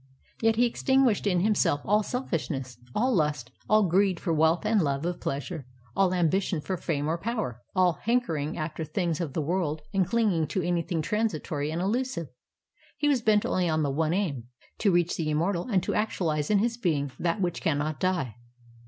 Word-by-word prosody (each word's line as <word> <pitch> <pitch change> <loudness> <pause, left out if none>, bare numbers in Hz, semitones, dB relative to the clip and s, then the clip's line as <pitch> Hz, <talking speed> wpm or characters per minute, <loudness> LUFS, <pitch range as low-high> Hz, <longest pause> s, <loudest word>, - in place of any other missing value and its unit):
Yet 225 0 +3
he 240 +2 +4
extinguished 250 -3 +2
in 180 -3 +2
himself 195 -8 +2
all 210 +2 +3
selfishness, 150 - -3 0.2
all 250 +4 +2
lust, 150 - 0 0.2
all 215 0 +5
greed 185 0 +2
for 170 - -1
wealth 160 +5 +2
and 215 -1 +3
love 140 -1 -1
of 175 0 -2
pleasure, 140 0 -4 0.3
all 195 -2 +3
ambition 180 0 +1
for 185 +5 -3
fame 150 -4 -2
or 165 +2 -1
power, 210 - -3
all 180 -3 +3
hanker 240 -6 +1
ing 150 +2 -3
after 160 0 -3
things 170 0 -1
of 155 -6 -3
the 155 - -1
world 155 -2 -1
and 190 -3 +2
clinging 195 -7 +1
to 190 - -1
anything 170 -1 -1
59 210 +7 0
INDIA 215 -9 0
transiton 150 0 -3
and 170 - -2
illusive. 215 - -1 0.7
He 295 -1 +2
was 270 -5 +2
bent 215 -2 +3
only 180 -2 +1
on 155 -1 +1
the 140 - 0
one 160 +4 +1
aim. 150 - -2 0.3
to 210 - +3
reach 175 -1 +2
the 160 -2 -1
immortal 170 +5 0
and 195 -7 +1
to - - -1
actualize 165 -8 0
in 210 - +4
his 230 +3 0
being 150 - 0
that 175 +4 0
which 175 -3 -1
cannot 150 -1 -1
die. 170 - -1
175 Hz, 195 wpm, -27 LUFS, 155-210 Hz, 0.7 s, all